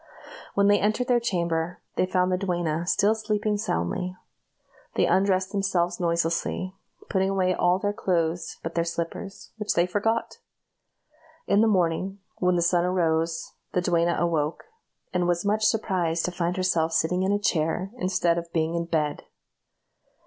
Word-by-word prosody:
When 200 - +4
they 205 0 +5
entered 215 +5 +1
their 245 -2 +4
chamber, 170 -5 -1 0.2
they 185 - +1
found 185 0 +1
the 180 - +2
duenna 175 -3 -1
still 205 +3 +3
sleeping 215 -1 -1
soundly. 180 - -2 0.8
They - - +3
undressed 190 -1 +2
themselves 180 -3 0
noiselessly, 170 +2 -1 0.3
putting 190 -1 +1
away 185 -2 +2
all 180 0 +2
their 205 +1 -1
clothes 170 -3 -1
but 165 - -4
their 170 - +1
slippers, 170 +3 -5
which 210 -1 -1
they 170 - +4
forgot. 210 +5 -1 1.1
In 205 - +3
the 225 - +4
morning, 185 -1 +1 0.2
when 180 0 +2
the 170 - +2
sun 175 0 +3
arose, 165 -2 0 0.2
the 180 - +2
duenna 170 -1 +2
awoke, 160 -3 0 0.5
and 180 -1 +1
was 175 +1 0
much 215 +1 +2
surprised 180 -7 +1
to 180 - -1
find 175 +1 -2
herself 170 -3 +1
sitting 180 +3 +1
in 190 +1 +1
a 205 - +3
chair, 175 -1 0
instead 180 -4 +1
of 170 0 -10
being 160 0 0
in 170 0 -1
bed. 155 -3 -1
180 Hz, 155 wpm, -26 LUFS, 170-195 Hz, 1.1 s, they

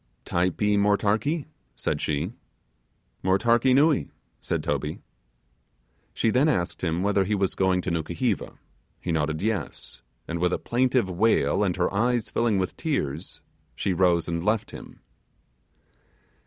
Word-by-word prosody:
'Typee 95 +4 +1
motarkee?' 105 +9 +1 0.3
said - - -2
she. 75 +6 -1 0.9
'Motarkee 115 +7 +3
nuee,' 145 +1 +3 0.3
said - - -2
Toby. - - -2 1.1
She 115 - +1
then 135 +7 +3
asked 90 - -1
him 85 +1 0
whether 100 -1 +2
he 105 +3 0
was 95 -1 0
going 95 -1 +1
to 90 - -3
Nukuheva; 85 +7 -2 0.4
he 90 - -3
nodded 80 +1 -1
yes; 105 - -3 0.3
and 85 0 -3
with 90 +1 +1
a - - +1
plaintive 125 -2 +1
wail 105 +3 +2
and 90 -4 0
her 90 +1 0
eyes 120 +2 +1
filling 115 -3 +1
with 95 -1 -2
tears 80 - -3 0.3
she 95 - -1
rose 90 -1 +2
and 85 -1 -2
left 105 +2 0
him. - - -11
95 Hz, 135 wpm, -26 LUFS, 85-115 Hz, 1.1 s, Motarkee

